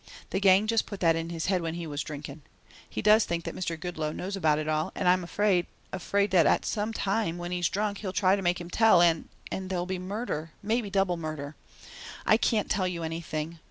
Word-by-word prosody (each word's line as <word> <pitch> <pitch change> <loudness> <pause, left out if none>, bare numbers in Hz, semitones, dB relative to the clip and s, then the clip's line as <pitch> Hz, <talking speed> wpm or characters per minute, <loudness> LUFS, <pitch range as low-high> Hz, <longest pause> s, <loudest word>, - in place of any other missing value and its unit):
The - - 0
gang 195 +1 +5
just 225 0 +1
put 200 - -7
that 165 -2 +4
in 165 0 -3
his 165 -2 -3
head 185 -2 +1
when 165 0 -3
he 170 -1 -5
was 145 -2 -3
drinking. 145 +1 -7 0.5
He - - -4
does 215 +1 +6
think 170 -1 -2
that - - -5
Mr. 170 -3 -3
Goodloe 155 -3 -3
knows 190 +5 -4
about 155 -6 +2
it 155 0 -3
all 155 0 0
and 180 - -1
I'm 180 0 +4
afraid 185 0 +1 0.3
afraid 200 +2 0
that 170 -5 +4
some 215 0 -1
time 195 -4 -1
when 175 0 -5
he's 175 -2 +1
drunk 205 0 -1
he'll 195 -3 -4
try 190 0 +3
to 200 - -3
make 175 -1 +1
him 175 - -7
tell 225 -4 +5
and 170 -2 +3 0.2
and 190 -1 -4
there'll 180 -2 -1
be 185 0 -3
murder, 185 -5 -4
maybe 220 +1 0
double 195 -2 +1
murder. 155 -2 -5 0.7
I 215 - +5
can't 220 -2 +1
tell 190 -3 +1
you 170 -2 -3
anything. 160 0 -4
180 Hz, 225 wpm, -28 LUFS, 165-200 Hz, 0.7 s, does